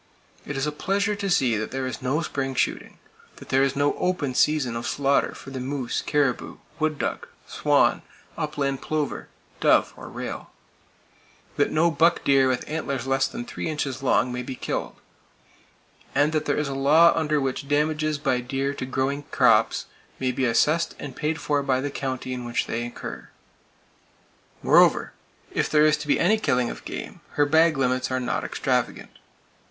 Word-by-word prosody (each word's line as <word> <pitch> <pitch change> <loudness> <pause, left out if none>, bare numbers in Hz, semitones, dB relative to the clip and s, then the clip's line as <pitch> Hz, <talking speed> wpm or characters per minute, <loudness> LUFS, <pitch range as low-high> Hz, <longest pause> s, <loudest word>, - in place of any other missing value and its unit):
It 145 - -4
is 135 - 0
a 150 - -1
pleasure 200 +7 0
to 200 -1 -3
see 125 - +2
that 110 - -3
there 130 0 -3
is 130 -3 -5
no 135 +6 0
spring 135 -3 -3
shooting; - - -1 0.4
that - - -13
there 135 - +3
is 140 0 +1
no 145 +1 +2
"open" 175 -8 0
season 135 -3 +2
of 115 - -4
slaughter 140 0 +1
for 135 - -11
the 130 - -5
moose, 130 -1 -2
caribou, 145 -4 0 0.2
wood 155 -1 0
duck, - - -3 0.2
swan, - - +2 0.3
upland 140 -3 -2
plover, 155 -2 -2 0.3
dove - - +3
or - - -10
rail; - - -6 1.1
that - - +2
no 165 +2 +2
buck 165 +1 +3
deer 135 -1 +4
with 130 -1 -1
antlers 140 -5 -3
less 135 0 +2
than 240 +1 -6
three 240 - -5
inches 140 -4 -3
long 125 -2 +2
may 125 - -3
be 130 +1 -6
killed; - - -4 1.2
and 145 +2 +3
that 155 -1 -1
there 145 - 0
is 150 - 0
a 140 - -3
law 150 +5 +5
under 150 -2 +1
which 135 +1 -3
damages 155 +1 +1
by 130 -3 0
deer 135 +3 -2
to 130 - -5
growing 135 +2 -1
crops - - +3 0.3
may 130 -1 0
be 130 +1 -1
assessed 150 +8 +2
and 145 - -8
paid 155 +1 -2
for 145 -2 0
by 135 -2 +1
the 140 +2 -3
county 130 -2 -4
in 125 -1 -5
which 120 0 -1
they 120 +1 -3
occur. 120 - -8 1.3
Moreover, - - +4 0.4
if - - 0
there 150 0 +5
is 155 0 +5
to - - -7
be 145 - +2
any 215 +6 +3
killing 125 - +1
of - - -10
game, - - -7
her 145 - +3
bag 160 +1 +4
limits 130 -1 0
are 130 0 0
not 125 - -2
extravagant. - - -2
140 Hz, 180 wpm, -25 LUFS, 130-155 Hz, 1.3 s, law